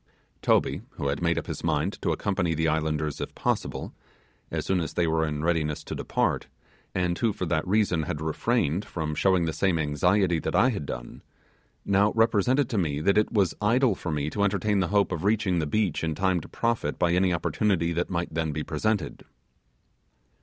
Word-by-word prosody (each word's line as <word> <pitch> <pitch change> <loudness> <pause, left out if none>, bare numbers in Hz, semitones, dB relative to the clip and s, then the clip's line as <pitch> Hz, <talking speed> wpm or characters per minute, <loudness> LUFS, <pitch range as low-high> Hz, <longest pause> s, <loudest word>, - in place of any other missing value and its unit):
Toby, - - +2
who 70 - -2
had 70 - -2
made 85 0 +1
up - - -2
his - - -6
mind - - -1
to - - 0
accompany 90 -5 0
the 80 +1 +1
islanders 75 -1 -1
if - - -5
possible, - - -2 0.6
as - - -3
soon 95 -1 +1
as 80 - -4
they 85 - +2
were 80 0 +1
in 75 0 -3
readiness 80 -3 0
to - - -6
depart, - - -1 0.5
and 90 -1 +1
who 115 - +2
for 95 - -4
that 80 +1 -1
reason 95 -4 +2
had 75 -1 -3
refrained 80 +2 0
from 80 -6 -4
showing 95 +1 +2
the 80 - -2
same 95 -1 +1
anxiety 85 +4 +2
that - - -3
I 125 - +5
had 75 - -4
done, - - -7 0.6
now 100 +1 +3
represented 115 +4 +3
to 110 - 0
me 75 -5 -1
that 95 +6 +2
it 105 0 +2
was 95 -6 +2
idle 120 +3 +3
for 90 - -6
me 75 -1 -1
to 100 - -2
entertain 100 +1 +1
the 95 - +1
hope 100 +1 +2
of 85 -1 -3
reaching 100 -4 +2
the 80 - -1
beach 95 0 0
in 80 -1 -1
time 95 0 +1
to - - -12
profit 115 0 -1
by 85 -1 +2
any 90 +1 +3
opportunity 85 +1 0
that 85 +1 -1
might 85 -2 -2
then 80 -1 -1
be 75 +1 -3
presented. 90 0 -2
85 Hz, 200 wpm, -26 LUFS, 80-100 Hz, 0.6 s, I